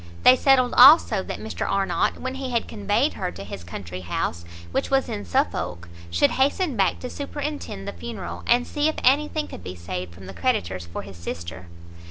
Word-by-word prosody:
They 255 - +9
settled 260 -2 +4
also 280 +7 +8
that - - -5
Mr - - -4
Arnott, 195 -2 +1
when 260 0 -4
he 265 -1 -4
had 235 -2 0
conveyed 215 +6 0
her 180 -2 -3
to 100 - -8
his 100 -3 -8
country 90 +1 -7
house, 85 -1 -3 0.3
which - - -1
was 270 -1 +2
in 100 - -5
Suffolk, 85 0 -1 0.2
should 85 0 +3
hasten 285 +3 +1
back 195 -3 +2
to 250 - -4
superintend 285 - -5
the - - -4
funeral, 85 +1 -6
and 245 +1 +4
see 295 +1 0
if 315 - -3
anything 300 +3 +2
could - - -10
be 90 - -6
saved 90 +1 -5
from 95 +2 -12
the 95 - -8
creditors 85 +1 -1
for 85 - -6
his 95 -2 -11
sister. 85 +1 -7
105 Hz, 195 wpm, -24 LUFS, -, 0.3 s, They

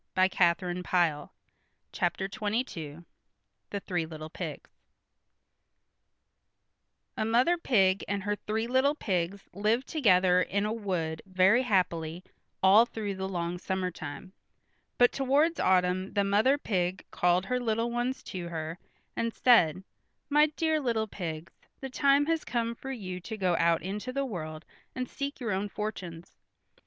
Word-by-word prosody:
[Illustration: 185 0 +4 0.5
The 170 -5 +1 0.6
Three 175 +2 -1
Little 195 - -3
Pigs] - - -32 0.6
THE 200 - -3
THREE 175 -4 -2
LITTLE 155 -1 -8
PIGS - - -6 2.5
A - - -1
mother 240 +10 +3
pig 195 - +2
and 200 -1 -2
her 205 +1 0
three 220 +2 -2
little 260 +4 +2
pigs 190 - -2
lived 215 +6 +1
together 185 - +4
in 200 +2 0
a 215 - -1
wood 175 -8 -3
very 190 +6 +4
happily 180 -7 0 0.4
all 205 +5 +7
through 215 -3 -4
the 190 0 -4
long 175 -1 -3
summertime, 185 -2 -4 0.6
but 245 0 +5
towards 285 +5 +2
autumn 185 +1 +2
the 200 - +2
mother 210 +8 +3
pig 185 -8 -2
called 180 +1 +2
her 250 +4 0
little 230 0 0
ones 245 +2 -2
to 180 -2 -6
her 160 0 -5 0.4
and 230 0 -1
said, 190 -9 +4 0.5
"My 300 +1 +6
dear 315 +1 0
little 230 -6 0
pigs, 165 -5 -6 0.3
the 270 -1 -6
time 280 +2 +3
has 325 0 0
come 235 -1 -1
for 265 +3 -7
you 185 -8 -5
to 220 +5 -7
go 185 -3 +1
out 165 -1 +2
into 210 +7 -4
the 275 +1 -1
world 155 -8 -6 0.3
and 255 -1 -3
seek 280 +2 -5
your 235 -5 -2
own 200 +2 -1
fortunes. 185 -6 -6
200 Hz, 145 wpm, -29 LUFS, 180-240 Hz, 2.5 s, all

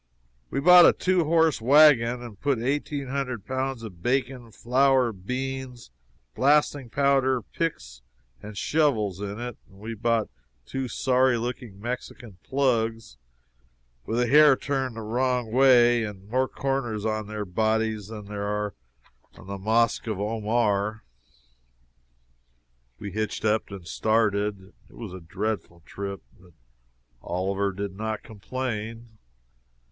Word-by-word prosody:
We - - -2
bought 175 +3 +8
a - - +5
two 185 -3 +1
horse 160 -4 +3
wagon 125 -2 +5
and 110 -5 -10
put 140 -3 +1
eighteen 140 +2 -2
hundred 130 -6 -3
pounds 130 -2 -3
of 90 -6 -10
bacon, 125 -1 -1
flour, 130 +2 +2
beans, 125 - -5 0.4
blasting 145 -2 +2
powder, 135 -2 +2
picks 65 - -4 0.4
and 105 -1 -9
shovels 110 - +1
in 100 +1 -5
it; 120 -1 -6
we 105 +3 -8
bought 115 0 0 0.3
two 135 - -4
sorry 130 0 +2
looking 120 -3 -5
Mexican 120 -3 -7
"plugs," 115 - -1 0.9
with 115 - -3
the 125 - +2
hair 150 +2 +7
turned 130 -3 -2
the 115 - -6
wrong 125 +1 -1
way 120 -2 +5
and 100 -2 -7
more 130 +4 +1
corners 125 -7 -2
on 110 -1 -2
their 105 -1 -4
bodies 110 +1 0
than 105 -2 -8
there 100 0 -4
are 105 0 -2 0.6
on - - -14
the 100 0 -6
mosque 115 +3 +1
of 110 -3 -3
Omar; 110 0 0 1.9
we 100 - -7
hitched 110 +1 -3
up 110 +1 +1
and 95 -4 -9
started. 105 -1 0 0.2
It - - -18
was 110 -6 -8
a 95 - -8
dreadful 95 -1 -4
trip. 100 -1 -6 0.2
But 90 -2 -20 0.7
Oliver 95 +4 -1
did 100 0 -5
not 110 +1 -4
complain. 115 0 -6
115 Hz, 130 wpm, -26 LUFS, 105-130 Hz, 1.9 s, bought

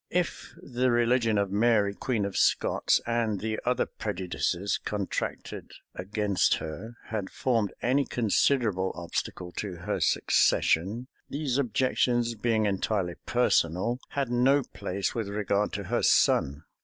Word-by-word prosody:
If 180 -1 -2
the 130 -1 -1
religion 120 -2 +2
of 100 -1 0
Mary 105 -1 +3
queen 110 -1 -1
of 100 - -5
Scots, - - +2
and 115 -3 0
the 110 +2 -3
other 125 -1 +2
prejudices 95 +1 -2
contracted 100 -3 -4 0.2
against 100 +1 +1
her, 110 +9 -7
had 105 -3 -3
formed 115 -6 0
any 135 +3 +2
considerable 110 -4 +1
obstacle 90 +1 -4
to 100 -4 -4
her 85 - -3
succession, 105 +10 +2 0.2
these 140 -2 -1
objections, 125 -2 +1
being 110 -1 0
entirely 95 -2 -1
personal, 120 -1 +1
had 140 -4 -2
no 135 +3 +3
place 100 -4 -4
with 115 -3 -3
regard 100 0 0
to - - -3
her - - -1
son. 70 +3 +3
110 Hz, 130 wpm, -28 LUFS, 100-120 Hz, 0.2 s, Mary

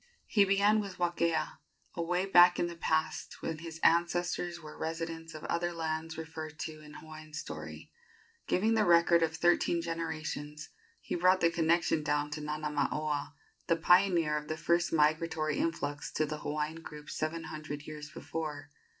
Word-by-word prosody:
He 205 -2 +4
began 200 +2 +4
with 200 -2 -7
Wakea, 170 -2 0 0.3
away 180 +2 0
back 175 -2 +7
in - - +1
the 170 0 -5
past, 160 -1 -1
when 160 -1 -3
his 160 0 -8
ancestors 175 +1 +2
were 155 -2 -10
residents 165 0 -5
of 155 - -8
other 175 +1 -1
lands 160 -1 -3
referred 160 -1 -7
to 155 -1 -6
in 150 0 -13
Hawaiian 155 -1 -10
story. - - -7 0.6
Giving 220 +5 +2
the 220 -1 +3
record 170 -2 +5
of 160 -1 +1
thirteen 175 +1 +3
generations, 155 -3 -4 0.3
he - - -5
brought 185 +2 +4
the 170 - +4
connection 170 -1 +2
down 150 0 0
to 150 0 -4
Nanamaoa, 150 0 -2 0.3
the 165 - +4
pioneer 170 -2 +4
of 150 0 -6
the 155 - -3
first 170 +1 +1
migratory 155 -1 +1
influx 145 -3 -2
to 155 - +1
the 150 0 -5
Hawaiian 150 +2 -3
group 150 -2 -9
seven 160 +1 -3
hundred 155 -2 -6
years 150 0 -8
before. 150 -3 -5
160 Hz, 160 wpm, -31 LUFS, 155-170 Hz, 0.6 s, back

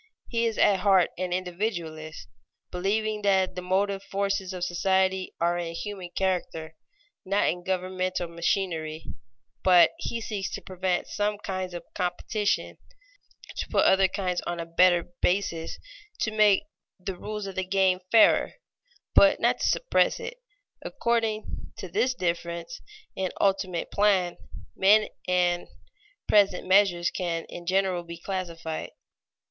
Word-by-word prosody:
He 230 -1 +1
is 225 - -3
at 200 -2 +4
heart 190 -4 +4
an 185 -1 -2
individualist, 175 -4 -4 0.4
believing 210 +4 -1
that 190 -2 +2
the 180 - -5
motive 195 +2 0
forces 200 -1 -2
of 180 -1 -5
society 190 +1 +1
are 175 +1 +1
in 165 -1 -4
human 195 -2 -6
character, 175 -4 -2 0.5
not 195 +2 +1
in 175 0 -1
governmental 185 -1 -2
machinery; 165 -2 -2 0.6
but 180 -2 +6
he 235 -8 -3
seeks 210 -3 -4
to - - -7
prevent 185 -1 -1
some 210 -1 -1
kinds 185 -3 -4
of 175 - -6
competition, 200 +3 -1 0.8
to - - -3
put - - +3
other 190 0 +5
kinds 185 -1 -2
on 175 0 -3
a 165 - -3
better 175 +1 +3
basis; 180 -3 0 0.4
"to 220 - 0
make 210 -2 +4 0.4
the 185 +1 -5
rules 210 +3 -5
of 195 - -6
the 190 - -2
game 185 -1 +2
fairer," 225 -2 +5 0.6
but 295 0 +6
not - - +2
to - - +1
suppress - - +2
it. - - -6 0.4
According 225 -2 -2
to - - -6
this 255 -11 0
difference 170 +2 -3 0.3
in 190 -1 -1
ultimate 190 -3 0
plan, 195 -4 +2 0.4
men 210 +3 +5 0.2
and 175 -1 +1 0.6
present 200 -3 +3
measures 185 -3 +4
can 170 -3 -3
in 175 0 -9
general 190 -1 +1
be 170 0 -9
classified. 170 -3 -5
185 Hz, 135 wpm, -27 LUFS, 175-200 Hz, 0.8 s, but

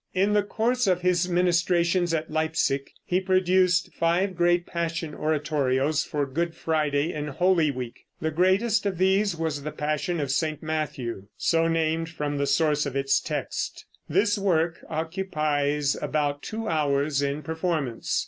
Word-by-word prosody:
In 195 +3 +2
the 210 - +4
course 230 +4 0
of 180 -1 +2
his 180 0 +2
ministrations 175 0 +2
at 160 -1 -2
Leipsic 155 -3 0 0.2
he 180 +1 +1
produced 185 -1 +2
five 180 +3 +1
great 175 0 +2
Passion 165 -2 -3
oratorios 150 -1 0
for 145 -1 -2
Good 165 +5 -2
Friday 155 -1 0
in 150 -1 -4
Holy 170 +2 +2
Week. 125 -3 -6
The 160 - -1
greatest 195 +6 +2
of 190 -3 -2
these 190 +1 +2
was 160 -3 -2
the 150 - -4
Passion 155 +3 -2
of 140 -2 -1
St. 155 +1 -1
Matthew, 135 -10 -3
so 165 0 +2
named 165 0 0
from 145 -3 -3
the 140 - 0
source 150 +1 +2
of 135 - -5
its 135 0 +2
text. - - -4 0.2
This 205 +6 +2
work 170 -4 +1
occupies 155 -4 -1
about 145 -1 -1
two 225 0 -5
hours 145 -2 +1
in 140 +2 -2
performance. 160 -7 -1
160 Hz, 150 wpm, -26 LUFS, 150-180 Hz, 0.2 s, the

